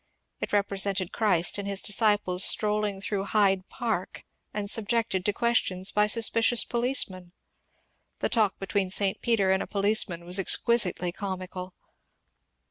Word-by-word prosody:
It -, -, -5 dB
represented 200 Hz, -2 st, 0 dB
Christ 195 Hz, -4 st, +1 dB
and 200 Hz, -, -5 dB
his 200 Hz, -1 st, +1 dB
disciples 205 Hz, -4 st, +2 dB
strolling 210 Hz, -2 st, +1 dB
through 200 Hz, -1 st, -3 dB
Hyde 195 Hz, -3 st, +1 dB
Park 220 Hz, -7 st, -4 dB, 0.3 s
and 205 Hz, -1 st, -5 dB
subjected 220 Hz, -3 st, -1 dB
to 205 Hz, -, 0 dB
questions 200 Hz, -4 st, 0 dB
by 210 Hz, 0 st, +2 dB
suspicious 230 Hz, +1 st, +3 dB
policemen. 225 Hz, -8 st, -2 dB, 0.8 s
The -, -, -1 dB
talk 215 Hz, -5 st, +1 dB
between 195 Hz, -1 st, -2 dB
St. 195 Hz, 0 st, +1 dB
Peter 215 Hz, -5 st, +1 dB
and 190 Hz, -, +1 dB
a -, -, -5 dB
policeman 200 Hz, -4 st, 0 dB
was 180 Hz, +3 st, 0 dB
exquisitely 190 Hz, -3 st, +1 dB
comical. 185 Hz, -1 st, -7 dB
200 Hz, 130 wpm, -26 LUFS, 185-215 Hz, 0.8 s, suspicious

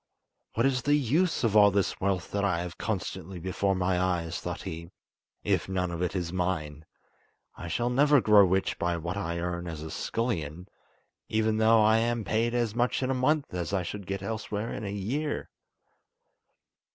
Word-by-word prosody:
"What 115 Hz, -, +2 dB
is 130 Hz, -2 st, +2 dB
the 145 Hz, +3 st, +3 dB
use 150 Hz, +6 st, +1 dB
of 110 Hz, -3 st, +1 dB
all 105 Hz, -1 st, +8 dB
this 100 Hz, -1 st, -1 dB
wealth 95 Hz, -2 st, -1 dB
that 100 Hz, 0 st, -1 dB
I 90 Hz, -4 st, +1 dB
have 90 Hz, -1 st, -7 dB
constantly 95 Hz, -3 st, -4 dB
before 95 Hz, +2 st, -1 dB
my 90 Hz, -1 st, +1 dB
eyes," 85 Hz, -3 st, -1 dB
thought -, -, -5 dB
he, 85 Hz, +1 st, -6 dB, 0.5 s
"if -, -, 0 dB
none 90 Hz, -2 st, -1 dB
of 85 Hz, 0 st, -4 dB
it 90 Hz, +2 st, -1 dB
is 90 Hz, -2 st, -2 dB
mine? 80 Hz, -5 st, -2 dB, 0.7 s
I 85 Hz, -, -7 dB
shall 120 Hz, +8 st, 0 dB
never 145 Hz, +3 st, +5 dB
grow 105 Hz, -3 st, +6 dB
rich 95 Hz, +1 st, +1 dB
by 85 Hz, 0 st, 0 dB
what 85 Hz, +3 st, -4 dB
I 85 Hz, -4 st, -3 dB
earn 85 Hz, 0 st, -3 dB
as 80 Hz, -2 st, -6 dB
a 80 Hz, -, -7 dB
scullion, 90 Hz, -8 st, -3 dB, 0.6 s
even 110 Hz, 0 st, +1 dB
though 110 Hz, 0 st, +5 dB
I 110 Hz, +1 st, +5 dB
am 120 Hz, 0 st, 0 dB
paid 115 Hz, +3 st, 0 dB
as 120 Hz, -3 st, 0 dB
much 120 Hz, +3 st, 0 dB
in 130 Hz, -, 0 dB
a -, -, +2 dB
month 140 Hz, +1 st, +1 dB
as 90 Hz, 0 st, -3 dB
I 95 Hz, -2 st, +1 dB
should 100 Hz, +2 st, -6 dB
get 100 Hz, 0 st, -3 dB
elsewhere 110 Hz, +1 st, -3 dB
in 105 Hz, -, -5 dB
a 100 Hz, -, -3 dB
year." 125 Hz, +10 st, -3 dB
100 Hz, 190 wpm, -28 LUFS, 90-115 Hz, 0.7 s, all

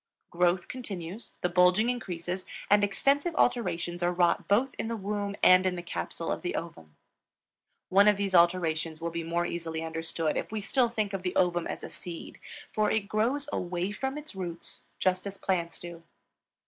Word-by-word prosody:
Growth 175 Hz, +1 st, +2 dB
continues, 200 Hz, -5 st, -6 dB
the 180 Hz, -, +1 dB
bulging 180 Hz, +5 st, +4 dB
increases, 185 Hz, -6 st, -3 dB, 0.3 s
and 205 Hz, 0 st, +6 dB
extensive 280 Hz, -, +2 dB
alterations 175 Hz, -7 st, +1 dB
are 175 Hz, 0 st, +2 dB
wrought 175 Hz, -1 st, +2 dB
both 245 Hz, +6 st, +3 dB
in -, -, -1 dB
the 230 Hz, -, -2 dB
womb 205 Hz, 0 st, -2 dB
and 185 Hz, 0 st, +8 dB
in 185 Hz, -1 st, +1 dB
the 175 Hz, -, -5 dB
capsule 170 Hz, -1 st, -4 dB
of -, -, -2 dB
the 175 Hz, -, -2 dB
ovum. 80 Hz, -, -7 dB, 0.9 s
One 200 Hz, +2 st, +6 dB
of 210 Hz, -1 st, +5 dB
these 200 Hz, -1 st, -1 dB
alterations 170 Hz, -2 st, +3 dB
will 170 Hz, 0 st, -3 dB
be 170 Hz, 0 st, -3 dB
more 170 Hz, +1 st, 0 dB
easily 165 Hz, -2 st, -3 dB
understood 165 Hz, -1 st, -1 dB
if -, -, -3 dB
we 220 Hz, -, -2 dB
still 240 Hz, +4 st, +2 dB
think 215 Hz, -3 st, -2 dB
of 195 Hz, -, -2 dB
the 180 Hz, -1 st, -3 dB
ovum 175 Hz, -2 st, +2 dB
as -, -, -5 dB
a -, -, -6 dB
seed, 170 Hz, -2 st, -8 dB, 0.3 s
for 215 Hz, -1 st, +2 dB
it 215 Hz, -2 st, 0 dB
grows 240 Hz, +7 st, +1 dB
away 180 Hz, +2 st, -2 dB
from 265 Hz, +6 st, -3 dB
its 300 Hz, -3 st, -8 dB
roots 175 Hz, -3 st, -6 dB
just 185 Hz, +1 st, +1 dB
as 195 Hz, 0 st, -7 dB
plants 170 Hz, -4 st, -1 dB
do. 170 Hz, -1 st, -8 dB
185 Hz, 185 wpm, -29 LUFS, 170-210 Hz, 0.9 s, and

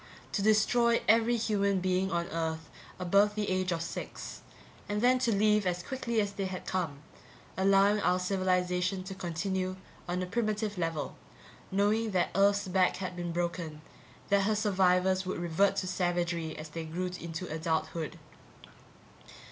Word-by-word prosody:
To -, -, -1 dB
destroy 230 Hz, +3 st, +3 dB
every 230 Hz, +2 st, +4 dB
human 200 Hz, -3 st, +1 dB
being 185 Hz, +1 st, +1 dB
on 170 Hz, 0 st, 0 dB
Earth 160 Hz, -1 st, -3 dB, 0.3 s
above 200 Hz, +3 st, +3 dB
the 210 Hz, -2 st, -1 dB
age 185 Hz, 0 st, 0 dB
of 165 Hz, -1 st, -1 dB
six -, -, -6 dB, 0.5 s
and 205 Hz, 0 st, 0 dB
then 250 Hz, +3 st, +4 dB
to 245 Hz, -2 st, +1 dB
leave 210 Hz, -1 st, +3 dB
as 175 Hz, 0 st, -1 dB
quickly 235 Hz, -2 st, -2 dB
as 205 Hz, -1 st, 0 dB
they 200 Hz, -1 st, -3 dB
had 185 Hz, -1 st, -5 dB
come, 160 Hz, -6 st, -3 dB, 0.5 s
allowing 195 Hz, +2 st, +4 dB
our 180 Hz, -, +3 dB
civilization 185 Hz, 0 st, 0 dB
to 190 Hz, +1 st, -6 dB
continue 185 Hz, +1 st, -2 dB, 0.3 s
on 180 Hz, +1 st, -1 dB
a -, -, -2 dB
primitive 215 Hz, +1 st, -1 dB
level, 165 Hz, -3 st, -2 dB, 0.5 s
knowing 210 Hz, +3 st, +2 dB
that 180 Hz, -2 st, +1 dB
Earth's 200 Hz, +1 st, +3 dB
back 185 Hz, 0 st, +2 dB
had 185 Hz, -1 st, -5 dB
been 175 Hz, -1 st, -3 dB
broken, 170 Hz, -3 st, -3 dB, 0.5 s
that 200 Hz, -1 st, +3 dB
her 215 Hz, +1 st, +2 dB
survivors 190 Hz, -2 st, +2 dB
would 185 Hz, -, -2 dB
revert 175 Hz, +3 st, +2 dB
to 185 Hz, -, -2 dB
savagery 175 Hz, -3 st, -1 dB
as 155 Hz, 0 st, -7 dB
they 165 Hz, +1 st, -5 dB
grew 180 Hz, +3 st, -3 dB
into 170 Hz, +2 st, -5 dB
adulthood. 160 Hz, -1 st, -2 dB
185 Hz, 155 wpm, -30 LUFS, 175-205 Hz, 0.5 s, every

